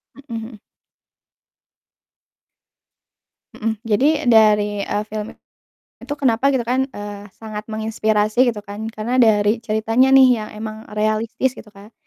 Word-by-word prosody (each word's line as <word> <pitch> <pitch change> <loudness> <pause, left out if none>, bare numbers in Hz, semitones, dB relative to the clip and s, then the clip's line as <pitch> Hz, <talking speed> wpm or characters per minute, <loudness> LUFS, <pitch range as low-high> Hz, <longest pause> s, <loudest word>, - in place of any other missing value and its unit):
Mhm, 275 - -16
mmm. 225 -1 -7 2.9
Mhm, 225 -1 -2
jadi 235 +5 +2 0.2
dari, 210 -2 +4
eee, 210 - -2
film 215 0 -5 0.7
itu 290 - -7
kenapa 260 -1 +2
gitu 255 -3 0
kan 260 +3 0
eee, 205 -3 -8
sangat 215 -1 -7
menginspirasi 220 +2 +1
gitu 210 - -8
kan 210 +2 -6
karena 225 +3 -3
dari 215 0 +3
ceritanya 225 +3 +1
nih 260 -1 +8 0.2
yang - - -10
emang 215 0 -6 0.2
realistis 215 +4 -1
gitu 215 - -12
Kak. 205 +2 -16
220 Hz, 125 wpm, -20 LUFS, 210-235 Hz, 2.9 s, nih